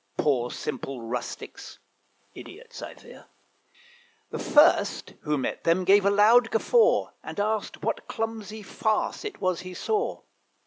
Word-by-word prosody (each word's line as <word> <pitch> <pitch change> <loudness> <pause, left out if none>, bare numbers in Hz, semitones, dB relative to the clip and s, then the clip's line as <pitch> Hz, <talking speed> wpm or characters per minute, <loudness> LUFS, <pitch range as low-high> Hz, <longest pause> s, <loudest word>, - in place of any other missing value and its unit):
Poor 125 -5 +1
simple 135 -2 -5
rustics 120 +1 -6 0.6
(idiots, 475 +4 -11
I - - -8
fear), - - -15 1.1
The - - -4
first 295 +2 +3
who 150 -1 -1
met 130 - -3
them 170 +2 +2
gave 200 +1 +5
a - - +6
loud 225 +4 +5
guffaw, 460 - +3
And - - -7
asked 215 +1 -2
what - - -2
clumsy 220 -1 -5
farce 215 +2 -1
it 425 - -6
was 185 -2 0
he 185 0 -8
saw. 430 - -1
205 Hz, 135 wpm, -26 LUFS, 155-225 Hz, 1.1 s, a